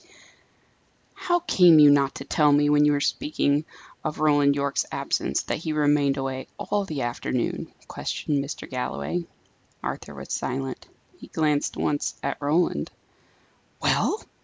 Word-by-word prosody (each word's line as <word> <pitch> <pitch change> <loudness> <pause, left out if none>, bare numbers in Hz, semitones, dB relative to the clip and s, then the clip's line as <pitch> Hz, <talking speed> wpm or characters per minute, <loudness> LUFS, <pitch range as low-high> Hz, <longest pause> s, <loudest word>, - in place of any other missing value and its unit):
"How 350 -1 0
came 180 - +6
you 150 -1 +8
not 140 -1 +2
to 135 - -7
tell 150 0 +3
me 145 0 +4
when 150 0 +5
we 150 - +5
were 145 -1 +2
speaking 150 - 0 0.4
of 150 - -3
Roland 145 -2 +4
Yorke's 140 0 -1
absence, - - -1
that - - -3
he 160 -1 -3
remained 145 -2 +2
away 135 -1 -4
all 205 0 -1
the 150 -8 -3
afternoon?" 120 +1 -2 0.2
questioned 145 -2 -2
Mr. 140 - -7
Galloway. 85 - -3 0.6
Arthur - - -5
was - - -7
silent. 135 0 -4 0.3
He - - -11
glanced 150 -2 0
once 145 -1 -1
at - - -3
Roland. 155 +5 +1 0.9
"Well?" 425 - +1
145 Hz, 140 wpm, -25 LUFS, 135-155 Hz, 0.9 s, you